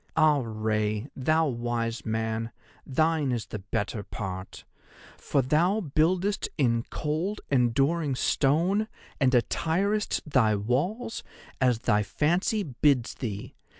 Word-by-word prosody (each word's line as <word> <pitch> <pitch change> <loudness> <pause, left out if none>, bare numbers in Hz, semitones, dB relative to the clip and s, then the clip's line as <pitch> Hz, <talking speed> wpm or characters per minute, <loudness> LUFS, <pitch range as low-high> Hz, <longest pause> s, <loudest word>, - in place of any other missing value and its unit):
Ah, 155 -3 +5
Rei, 110 -1 -1
thou 155 +4 +2
wise 120 -2 -2
man, 110 +1 -2 0.4
thine 155 0 +1
is 120 -3 -2
the 110 - -6
better 100 +2 -3
part, 95 -1 -6 0.5
for 140 - 0
thou 170 - +2
buildest 180 +4 +1
in 115 -5 +2
cold 165 +8 -2
enduring 135 +4 +2
stone 170 +12 +2 0.3
and 130 -2 +3
attirest 190 - +1
thy 120 -7 +3
walls 145 - -1 0.4
as 125 -3 +4
thy 105 0 +2
fancy 175 - +1
bids 135 -3 +1
thee. 105 -5 -5
135 Hz, 115 wpm, -27 LUFS, 115-160 Hz, 0.5 s, Ah